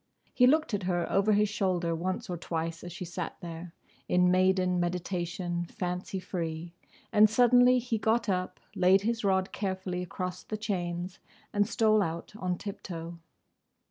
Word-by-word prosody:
He 250 - +5
looked 305 -3 +3
at 205 - 0
her 175 -2 0
over 200 +2 +3
his 210 +1 +3
shoulder 185 -4 0
once 180 +3 -3
or 180 - -3
twice 165 -1 -4
as 175 - -7
she 180 - -6
sat 175 0 -5
there, 170 0 -8 0.3
"In 180 0 +4
maiden 185 -1 +3
meditation, 175 0 -2
fancy 180 +2 -4
free," 170 -2 -4 0.4
and 210 0 +7
suddenly 245 +2 +5
he 240 -2 -1
got 225 +1 +1
up, 185 -2 -1 0.2
laid 185 +2 +5
his 230 +2 -1
rod 190 -1 +1
carefully 190 -2 -3
across 180 0 -4
the 215 - -5
chains, 180 -3 -3 0.3
and 205 0 +2
stole 215 -2 +3
out 165 0 -3
on 180 -4 -2
tip 200 +1 -7
toe. 170 -1 -7
185 Hz, 160 wpm, -29 LUFS, 175-205 Hz, 0.4 s, and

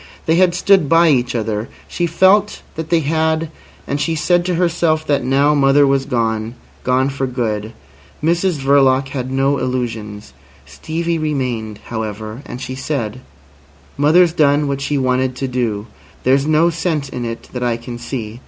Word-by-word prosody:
They 160 +1 +2
had 180 -1 +3
stood 185 -5 +3
by 165 0 +5
each 125 -4 +1
other. 110 -1 -2 0.2
She 175 - -1
felt 190 +5 +3
that 160 0 -6
they 170 -1 +3
had, 160 +1 0 0.4
and 145 +1 -2
she 165 +1 0
said 175 +3 +2
to 180 -1 0
herself 165 -2 +1
that 140 -3 +1
now 140 +3 +3
mother 140 0 +4
was 135 -1 +1
gone—gone 120 +2 -2
for 135 -1 -2
good. 110 -3 -3 0.5
Mrs 175 +3 +2
Verloc 135 -1 +3
had 130 -2 -4
no 135 +1 +1
illusions. 115 - -4 0.3
Stevie 165 - -3
remained, 125 -8 -3
however. 110 +1 -5
And 125 - -7
she 130 0 -5
said: 130 -3 -4 0.7
"Mother's 160 +4 +4
done 145 -2 +3
what 140 0 -2
she 145 +1 -1
wanted 130 -1 0
to 135 +1 -3
do. 115 -5 -2 0.4
There's 135 +3 +2
no 155 +2 +3
sense 160 -3 -2
in 125 -2 -5
it 115 0 -6
that 125 - -4
I 120 -2 0
can 120 0 -8
see. 120 -2 -6
135 Hz, 160 wpm, -18 LUFS, 120-160 Hz, 0.7 s, by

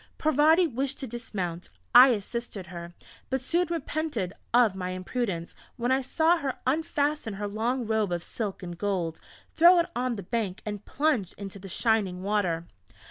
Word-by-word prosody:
Parvati 310 +4 +4
wished 270 -1 -2
to - - -2
dismount; 200 -8 -5 0.2
I 255 - +11
assisted 230 -3 -2
her 170 0 -8 0.3
but 265 - 0
soon 340 +7 0
repented 305 - -2 0.2
of 235 -4 +5
my 185 -1 -4
imprudence, 185 -2 -3 0.2
when 245 +1 -1
I 265 +1 +3
saw 320 +6 +3
her 275 -5 -3
unfasten 290 -4 0
her 205 +1 -3
long 235 +4 -1
robe 215 -3 0
of 175 -1 -2
silk 205 -5 -5
and 175 -1 -6
gold, 175 -4 -2 0.3
throw 345 +3 +7
it 340 - +4
on 250 0 0
the 200 - -6
bank, 205 -2 -3
and 210 -1 -5
plunge 270 - 0
into 200 0 -8
the 195 0 -9
shining 195 -3 +1
water.... 190 -5 0
225 Hz, 165 wpm, -27 LUFS, 190-270 Hz, 0.3 s, I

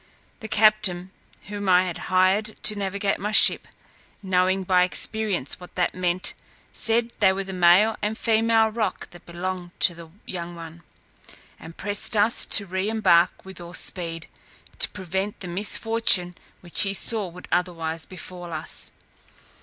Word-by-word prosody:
The 220 - -8
captain 210 -4 +2 0.3
whom 205 -1 -5
I 180 0 +5
had 180 -2 -5
hired 190 +4 +1
to 215 - +4
navigate 200 0 -2
my 210 +1 -3
ship, 215 - +4 0.6
knowing 185 0 +1
by 180 -1 +2
experience 185 - -1
what 180 - -14
they 180 - +2
meant, 180 0 0 0.4
said 230 +1 +1
they 190 -3 +4
were 195 +1 -3
the 190 0 -8
male 185 +5 +4
and 210 +1 -2
female 225 -1 +2
roc 215 -3 -4
that 175 - -16
belonged 175 +1 -6
to 175 - +5
the 170 -1 -12 0.2
young 175 -1 -6
one, 165 0 -11 0.8
and 165 +1 -12
pressed 205 +2 0
us 210 +3 +2
to 200 - +3
re 190 +2 -3
embark 185 -7 +2
with 190 -2 -11
all 175 +1 -9
speed, 165 -2 +2 0.5
to - - +6
prevent 190 +2 -4
the 185 - -8
misfortune 200 0 +2 0.3
which 175 -2 -2
he 195 0 0
saw 215 -1 -1
would 180 +1 -12
otherwise 165 -2 -2
befall 180 -1 -9
us. 155 -1 0
185 Hz, 155 wpm, -23 LUFS, 175-210 Hz, 0.8 s, to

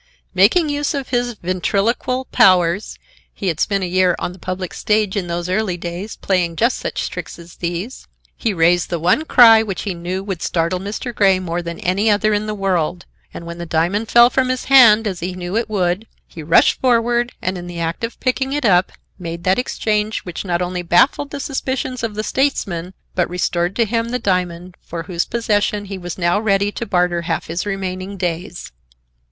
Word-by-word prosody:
Making 210 - +4
use 290 +1 -1
of 275 -2 -4
his 245 -1 0
ventriloquial 200 +8 0
powers—he 190 - +1
had 165 -2 -3
spent 200 -2 0
a - - -1
year 180 0 +2
on 180 - -4
the 185 - -15
public 185 0 -5
stage 210 -2 0
in 190 -4 -2
those 170 0 -3
early 185 -1 -1
days, 175 +5 -6
playing 180 -3 0
just 235 +8 +1
such - - -3
tricks - - -7
as 170 0 -14
these—he 185 +5 -5
raised 175 -1 +2
the 170 - -1
one 180 - +2
cry 225 -6 +7
which 200 -4 -4
he 200 - -2
knew 180 +2 -4
would 195 -4 -5
startle 170 +2 0
Mr. 210 +6 -5
Grey 195 -3 +4
more 175 -1 -3
than 170 -1 -6
any 195 +5 +1
other 215 +1 +2
in 210 +1 -1
the 215 - -3
world, 180 -3 -1 0.3
and 170 - -9
when 170 0 -7
the 170 - -5
diamond 175 +8 0
fell 240 +1 +6
from 260 0 +1
his 255 0 -2
hand, 230 -5 +7
as 190 -5 -3
he 180 +2 -4
knew 180 +1 -5
it 230 -1 0
would, 190 +1 -1 0.2
he 165 - -10
rushed 160 +2 +3
forward 240 -1 +2
and, 185 +1 -2
in 175 -1 -7
the 175 -1 -7
act 165 +5 -3
of 230 +1 -4
picking 265 +1 -1
it 290 -3 -1
up, 185 -3 +3 0.3
made 170 -1 -6
that 190 +4 +2
exchange 215 -3 -1
which 180 -3 -6
not 180 -2 -1
only 180 0 -3
baffled 215 - +2
the 285 - -6
suspicions 260 -2 -3
of 225 -2 -3
the 215 - -2
statesman, 190 -11 -1 0.2
but 180 - 0
restored 175 0 -1
to 230 - +2
him 230 +1 -1
the 250 - -1
diamond, 180 -4 -2
for 165 0 -6
whose 170 0 -2
possession 210 -3 0
he 195 -1 -6
was 175 -2 -6
now 175 +2 +1
ready 200 -1 +1
to 235 - -5
barter 180 -2 +1
half 165 -1 -2
his 170 +5 -4
remaining 190 0 -4
days. 175 0 -4
190 Hz, 200 wpm, -19 LUFS, 175-225 Hz, 0.3 s, cry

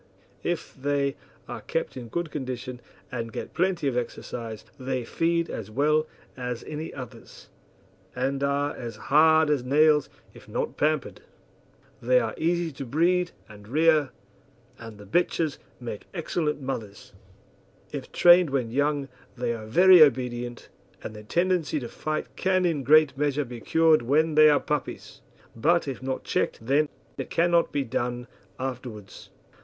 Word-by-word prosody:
If - - -3
they 140 0 -1 0.3
are - - -6
kept - - -3
in 125 -2 -7
good 170 +6 -3
condition 130 -3 -5 0.3
and 115 -2 -4
get - - -6
plenty 180 -3 0
of 130 - 0
exercise 115 -2 -5
they 130 -1 -3
feed 170 +5 0
as 110 -2 -6
well 150 +6 +2 0.3
as 125 -2 -4
any 155 +1 -6
others, 125 -4 -11 0.7
and 135 +2 -1
are 140 +1 0
as 115 -2 -6
hard 160 +5 +4
as 140 -4 +1
nails 150 +3 +4 0.2
if - - -15
not - - -2
pampered. - - -1 0.8
They - - +4
are - - -2
easy 170 0 0
to 135 0 -7
breed 175 +7 +2 0.2
and 105 -1 -14
rear, 155 +2 +3 0.7
and 115 -2 -10
the 105 - -12
bitches 160 - 0 0.2
make 115 -4 -7
excellent 155 -4 -2
mothers. 110 -7 -6 0.8
If - - -6
trained 175 -1 +6
when 130 -4 -1
young 145 +1 0 0.3
they 120 -1 -1
are 110 -2 -7
very 180 +8 +7
obedient, 120 -3 +2 0.4
and 110 - -7
their 105 - -9
tendency 170 +4 0
to 120 - -6
fight 155 +5 -4
can 185 -1 +1
in 165 -4 +1
a - - -5
great 150 +2 +5
measure 145 -1 +1
be 120 -1 -8
cured 160 +1 +4
when 155 +6 +2
they 155 0 +7
are 145 - +4
puppies; 150 -2 -4 0.3
but, 165 +8 +2
if 135 -2 -5
not 130 0 -3
checked - - -1
then, 145 +4 +2 0.3
it - - -4
cannot 170 0 +2
be 140 - 0
done 120 0 -3 0.3
afterwards. 125 -6 -7
140 Hz, 150 wpm, -26 LUFS, 125-160 Hz, 0.8 s, very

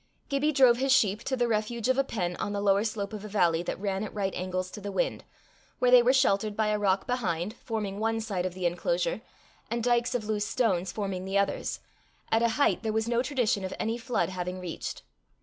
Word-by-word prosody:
Gibbie 285 +2 +1
drove 260 -4 +5
his 270 +2 +1
sheep 215 -4 +3
to 260 - -1
the 240 -1 +2
refuge 225 +1 -1
of 260 - +3
a - - +4
pen 180 -9 -2
on 205 - -3
the 200 - -1
lower 200 0 +3
slope 215 -2 -3
of 210 -1 -6
a - - -6
valley 175 -5 +2
that 175 - -4
ran 195 0 -2
at 215 - -5
right 195 -2 -1
angles 185 0 -3
to 210 - -8
the 200 0 -5
wind, - - -1 0.5
where 250 0 +3
they 250 -1 +9
were 240 +2 +4
sheltered 215 -6 +2
by 215 -1 +2
a 210 0 +1
rock 195 -1 +1
behind, 200 -6 -1
forming 210 -4 -4
one 225 +1 0
side 195 -5 -2
of 180 - -8
the 185 -1 -4
enclosure, - - 0 0.5
and 235 -1 -2
dykes 240 0 +2
of 225 -3 -1
loose 210 -1 -1
stones, 190 -9 +1
forming 195 -3 -3
the 195 +1 -1
others, 200 0 -1 0.5
at 225 - +3
a 235 - +3
height 285 - +3
there 220 - -1
was 220 +1 0
no 235 0 +2
tradition 245 -7 0
of 190 - -4
any 225 +1 0
flood 245 -3 0
having 180 0 -4
reached. 180 -2 -6
215 Hz, 230 wpm, -28 LUFS, 195-240 Hz, 0.5 s, they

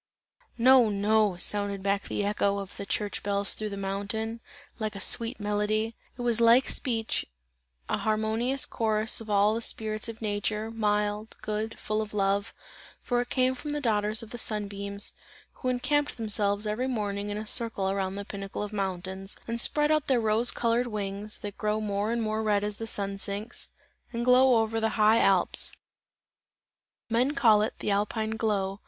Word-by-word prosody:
"No, 250 -1 +6
no!" 205 -1 +2
sounded 200 +1 0
back 200 0 0
the 205 - -2
echo 200 -1 +1
of 195 -1 -7
the 200 - -6
church 205 0 -2
bells 200 0 +1
through 215 -1 -4
the 200 - -6
mountain, 205 +4 -3 0.4
like 215 -1 -3
a - - -6
sweet 230 +5 0
melody; 210 +2 -1 0.2
it - - -6
was 235 -1 +2
like 235 +3 +6
speech, 225 -5 -1 0.6
an - - -1
harmonious 220 +5 0
chorus 220 -1 0
of 220 - -10
all 205 +1 +4
the 230 - -2
spirits 215 -1 +1
of 225 -1 -8
nature, 215 +1 -2
mild, 210 -1 -1
good, 215 +1 -3
full 215 0 -2
of 210 -1 -6
love, 200 +1 +1 0.5
for 245 -1 +1
it 245 - -6
came 255 0 +2
from 295 +3 -5
the 295 - -1
daughters 215 -3 0
of 220 - -12
the 240 - -6
sun 210 -2 -2
beams, 200 0 -2 0.4
who 255 - -3
encamped 290 +4 0
themselves 210 -2 +1
every 215 +4 -1
evening 205 -5 -2
in 205 - -3
a 215 - -5
circle 215 -4 +1
around 195 -1 -2
the 200 0 -5
pinnacles 200 0 -5
of 205 - -9
the 210 - -5
mountains, 190 0 -2
and 230 0 -1
spread 295 +3 +3
out 305 -2 +2
their 260 -3 +3
rose 220 +2 +4
coloured 235 +1 +1
wings, 205 -1 -4
that 205 -1 -8
grow 215 0 0
more 205 0 -1
and 235 -1 0
more 215 0 -1
red 210 -2 +1
as 210 0 -3
the 225 - -5
sun 200 -2 -2
sinks, 205 +4 -5 0.4
and 235 0 -3
glow 250 -2 +5
over 225 0 -2
the 220 0 -1
high 215 +1 +5
Alps; 190 -5 +3 1.3
men 245 +5 +1
call 220 -5 +5
it, 215 - -1
"the - - -2
Alpine 215 +2 0
glow." 205 -3 -1
215 Hz, 185 wpm, -28 LUFS, 200-230 Hz, 1.3 s, No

